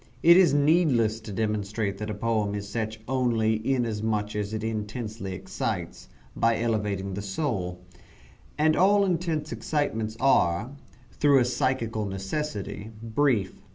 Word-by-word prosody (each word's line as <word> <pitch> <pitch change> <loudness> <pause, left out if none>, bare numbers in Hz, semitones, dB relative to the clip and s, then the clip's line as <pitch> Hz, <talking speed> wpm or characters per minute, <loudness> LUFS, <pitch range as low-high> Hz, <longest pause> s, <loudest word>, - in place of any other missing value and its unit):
It 170 +1 +8
is 185 -1 +6
needless 145 -7 +3
to 110 -1 -9
demonstrate 105 -1 -2
that 105 0 -4
a 105 - -3
poem 105 -1 0
is 100 0 -5
such 110 +1 -3
only 115 -4 +1
inasmuch 110 -4 -1
as 105 -1 -2
it 110 0 -3
intensely 110 -2 -4
excites, 90 -8 -4 0.3
by 115 0 +2
elevating 105 -4 -1
the 100 - -4
soul; 95 - -3 0.8
and 155 +1 +3
all 200 +2 +4
intense 165 -4 -1
excitements 110 -8 -2
are, 115 -4 +2 0.4
through 145 -2 +4
a 130 - +5
psychal 115 -4 -1
necessity, 100 +2 -4
brief. 115 -5 0
110 Hz, 130 wpm, -26 LUFS, 105-135 Hz, 0.8 s, It